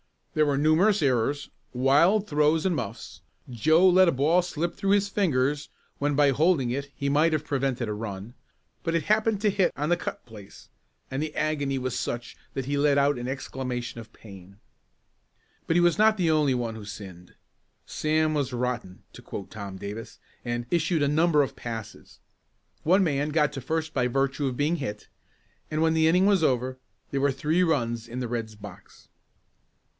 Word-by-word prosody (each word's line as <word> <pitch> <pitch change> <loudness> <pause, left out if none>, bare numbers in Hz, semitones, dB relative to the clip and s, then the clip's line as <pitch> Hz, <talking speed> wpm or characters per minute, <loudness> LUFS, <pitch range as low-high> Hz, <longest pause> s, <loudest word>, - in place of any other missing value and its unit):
There 155 -1 +3
were 140 -1 +1
numerous 160 +7 +3
errors, 135 +2 0 0.2
wild 145 +11 +3
throws 150 0 +2
and 185 - +2
muffs. - - -6 0.3
Joe 160 - +4
let 185 0 +6
a - - +4
ball 155 +7 +3
slip 175 -1 -3
through 195 +2 -1
his 200 0 +3
fingers 145 -7 0 0.3
when 145 0 0
by 145 -1 +4
holding 145 -3 +2
it 140 +2 -3
he 140 - -3
might 155 +3 +3
have 155 -1 0
prevented 135 -4 -1
a 105 - -2
run, 105 +1 -6 0.5
but 165 0 -1
it 165 - +1
happened 215 +1 +1
to 210 -1 +3
hit 195 -2 +1
on 150 +3 -2
the 175 - +3
cut - - -6
place, 105 -4 -14 0.4
and 135 +2 -2
the 155 -1 -4
agony 145 -3 -1
was 130 -1 -2
such 120 0 -4 0.2
that 135 - -3
he 140 +1 -1
let 140 0 +3
out 140 -1 +2
an 120 - -5
exclamation 125 -2 -4
of 115 - -12
pain. 100 -2 -14 1.1
But 165 - +1
he 175 - +5
was 175 +3 +3
not 215 0 +5
the 170 -4 +2
only 150 -4 +2
one 120 -2 -2
who 110 -2 -9
sinned. 95 -4 -10 0.5
Sam 155 0 0
was 140 -4 -1
"rotten," 120 -6 -3
to - - -12
quote 95 - -8
Tom 100 -3 -7
Davis, 105 +4 -7 0.3
and 120 0 -3
"issued 165 -2 +1
a - - +2
number 155 0 +3
of 135 - -5
passes." 115 -3 -8 0.6
One 185 +5 +4
man 145 -3 0
got 150 -1 +2
to 135 - -5
first 160 +4 -2
by 125 -2 +1
virtue 135 +2 0
of 125 -2 -3
being 150 +4 +1
hit 105 -8 -6 0.6
and 155 0 -1
when 160 0 +3
the 160 0 +3
inning 180 +4 +4
was 200 -3 +4
over 130 -3 0 0.3
there 140 - -1
were 140 -1 +2
three 155 +6 0
runs 120 -9 0
in 120 +2 -6
the 125 -2 -3
Red's 115 -2 -4
box. 100 -3 -13
140 Hz, 190 wpm, -26 LUFS, 120-160 Hz, 1.1 s, let